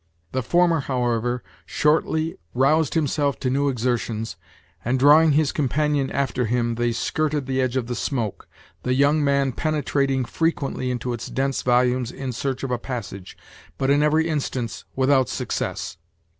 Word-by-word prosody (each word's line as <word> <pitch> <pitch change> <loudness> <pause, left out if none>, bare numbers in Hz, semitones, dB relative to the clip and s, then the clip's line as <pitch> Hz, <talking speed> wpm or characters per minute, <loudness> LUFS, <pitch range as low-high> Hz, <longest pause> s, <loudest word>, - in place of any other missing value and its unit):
The 130 - -1
former, 170 +4 +3
however, 120 -2 -1 0.2
shortly 160 +1 +1 0.2
roused 150 +5 +3
himself 145 -2 0
to 130 - 0
new 140 +2 +2
exertions, 115 -5 -2 0.5
and, 125 +3 +1
drawing 150 +3 +6
his 150 0 +2
companion 150 -1 0
after 125 -3 -1
him, 120 0 0
they 120 +1 0
skirted 150 +3 -1
the 130 0 0
edge 130 0 0
of 125 - -1
the 120 - -4
smoke, 110 +1 -3 0.3
the 125 0 0
young 145 +3 +3
man 140 -1 +2
penetrating 140 -2 0
frequently 140 -4 -1
into 125 0 -2
its 120 - -5
dense 135 0 -1
volumes 125 0 +2
in 135 -1 -5
search 130 +2 -3
of 135 - -2
a 125 - 0
passage, 100 -7 -6 0.4
but 135 +1 +1
in 145 +1 +4
every 155 +2 +3
instance 135 -6 -3
without 130 0 +3
success. - - -3
130 Hz, 155 wpm, -23 LUFS, 125-145 Hz, 0.5 s, drawing